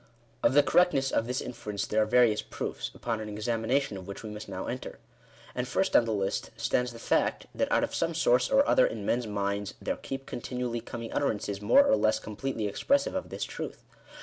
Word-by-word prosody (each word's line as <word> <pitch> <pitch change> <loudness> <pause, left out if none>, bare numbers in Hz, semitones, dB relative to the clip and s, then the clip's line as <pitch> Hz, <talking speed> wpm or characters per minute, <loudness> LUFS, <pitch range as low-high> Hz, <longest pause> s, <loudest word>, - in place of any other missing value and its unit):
Of 125 - +3
the 145 - +7
correctness 145 -6 +3
of 115 - +1
this 125 +1 -1
inference 105 -4 -4
there 110 - +1
are 105 - +2
various 120 -2 +4
proofs, - - -5
upon 115 -2 -2
an 105 - -5
examination 115 +3 -1
of 95 -1 -9
which 100 - -7
we 110 - -6
must 105 -1 -8
now 95 -1 -4
enter. 125 - -5 0.6
And - - -2
first - - 0
on 120 - +6
the 115 - -2
list 100 -2 -1
stands 125 0 0
the 115 - -10
fact, - - 0
that, - - -1
out - - +3
of - - -2
some 165 0 0
source 125 -6 +3
or 275 +2 +4
other 260 - +5
in 110 -3 -5
men's 120 +1 0
minds, 100 -1 -2
there - - -2
keep 135 0 -6
continually 120 -1 -3
coming 115 0 -7
utterances 105 -7 -1
more 280 - +6
or 275 -1 +4
less 110 0 +2
completely 110 +2 -4
expressive 280 - +1
of 280 -1 -3
this - - -4
truth. - - -6
115 Hz, 210 wpm, -29 LUFS, 105-135 Hz, 0.6 s, the